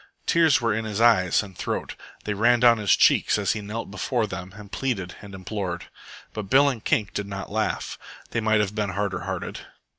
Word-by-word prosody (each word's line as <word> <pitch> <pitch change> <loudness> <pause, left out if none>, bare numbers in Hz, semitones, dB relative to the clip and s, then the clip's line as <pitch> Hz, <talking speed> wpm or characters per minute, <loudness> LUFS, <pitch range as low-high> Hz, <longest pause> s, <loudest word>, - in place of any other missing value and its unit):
Tears 165 -3 +4
were 115 -3 +1
in 110 +2 -1
his 105 -1 -3
eyes 110 -6 +4
and 95 -2 -11
throat. - - -3 0.3
They 105 - -2
ran 120 +4 +3
down 120 -2 +6
his 105 -3 +4
cheeks - - +4
as 100 -1 +1
he 110 - -2
knelt 105 0 -6
before 115 +4 -1
them 95 -2 -7
and 105 -1 -12
pleaded 105 -10 -2
and 100 -1 -10
implored. 95 -2 -5 0.4
But 105 -3 -5
Bill 140 +3 +6
and 120 -6 -5
Kink 105 -4 0
did 100 -1 -3
not 100 -1 -6
laugh. 110 +1 -2 0.3
They 115 - -1
might 110 -1 +3
have 100 -1 -2
been 105 -2 -1
harder 100 0 -2
hearted. - - -4
105 Hz, 205 wpm, -25 LUFS, 100-115 Hz, 0.4 s, down